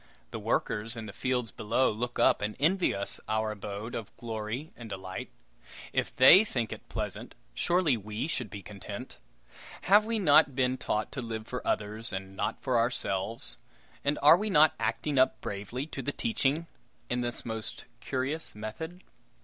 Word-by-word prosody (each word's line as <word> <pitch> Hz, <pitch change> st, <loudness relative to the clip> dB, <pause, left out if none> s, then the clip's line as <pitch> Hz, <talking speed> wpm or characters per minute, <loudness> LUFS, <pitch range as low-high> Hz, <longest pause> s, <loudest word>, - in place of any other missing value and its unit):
The -, -, -4 dB
workers 110 Hz, +2 st, -1 dB
in 115 Hz, -, -5 dB
the 100 Hz, -, -8 dB
fields 125 Hz, -4 st, -1 dB
below 115 Hz, +6 st, +1 dB
look 120 Hz, +3 st, -3 dB
up -, -, +4 dB
and 105 Hz, +1 st, -2 dB
envy 180 Hz, +6 st, +3 dB
us 100 Hz, 0 st, -4 dB
our 110 Hz, 0 st, +1 dB
abode 105 Hz, +2 st, -6 dB
of 110 Hz, -3 st, -6 dB
glory 115 Hz, +5 st, -4 dB
and 115 Hz, -2 st, -9 dB
delight! 95 Hz, -1 st, -6 dB, 0.6 s
If -, -, -1 dB
they 170 Hz, +10 st, +9 dB
think 120 Hz, -, -2 dB
it -, -, -8 dB
pleasant, -, -, -5 dB, 0.2 s
surely 175 Hz, -5 st, +2 dB
we 105 Hz, +3 st, -4 dB
should 125 Hz, -8 st, -3 dB
be 100 Hz, -2 st, -8 dB
content. 100 Hz, -3 st, -8 dB, 0.6 s
Have 205 Hz, +3 st, +6 dB
we 225 Hz, 0 st, 0 dB
not 150 Hz, -7 st, +5 dB
been 130 Hz, -1 st, +2 dB
taught 105 Hz, -4 st, -2 dB
to 135 Hz, -, -4 dB
live 110 Hz, -2 st, -5 dB
for 125 Hz, -, -4 dB
others 110 Hz, +2 st, -1 dB
and 95 Hz, 0 st, -5 dB
not 110 Hz, -, -2 dB
for 125 Hz, -3 st, +2 dB
ourselves, 115 Hz, -2 st, +1 dB, 0.5 s
and 145 Hz, +1 st, +1 dB
are 150 Hz, +3 st, +9 dB
we 215 Hz, +2 st, -2 dB
not 155 Hz, -4 st, +6 dB
acting 115 Hz, +5 st, 0 dB
up 130 Hz, 0 st, +4 dB
bravely 105 Hz, +7 st, -4 dB
to 145 Hz, -3 st, -6 dB
the 145 Hz, -, -2 dB
teaching 165 Hz, -, 0 dB, 0.4 s
in 125 Hz, 0 st, -1 dB
this 120 Hz, 0 st, -1 dB
most 110 Hz, -1 st, -5 dB
curious 135 Hz, +3 st, -2 dB
method? 160 Hz, -, -6 dB
120 Hz, 170 wpm, -30 LUFS, 110-145 Hz, 0.6 s, they